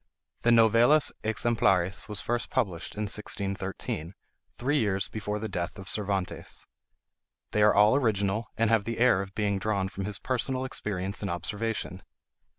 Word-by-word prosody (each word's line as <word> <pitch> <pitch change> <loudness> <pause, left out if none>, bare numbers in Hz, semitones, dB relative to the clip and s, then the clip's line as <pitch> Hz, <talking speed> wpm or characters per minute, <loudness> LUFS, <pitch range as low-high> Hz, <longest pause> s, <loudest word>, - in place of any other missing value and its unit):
The 120 - +2
"Novelas 120 +6 +5
Exemplares" 100 -5 +1
were 105 - -4
first 120 +2 -2
published 95 -10 -2
in 105 - -2
1613, 95 -4 -4 0.4
three 145 +4 0
years 100 -4 0
before 105 -1 -3
the 110 +1 -3
death 90 -1 -4
of 95 -1 -9
Cervantes. 100 -3 -2 0.9
They 105 - +1
are 105 0 +6
all 105 +3 +6
original, 110 -4 +1
and 115 0 +2
have 110 -3 +3
the 115 0 -3
air 120 -6 +4
of 100 0 -8
being 100 -2 0
drawn 100 -2 0
from 95 0 -5
his 105 -1 +1
personal 130 +3 -1
experience 100 -6 -3
and 100 - -2
observation. 95 +1 -3
105 Hz, 155 wpm, -28 LUFS, 95-115 Hz, 0.9 s, are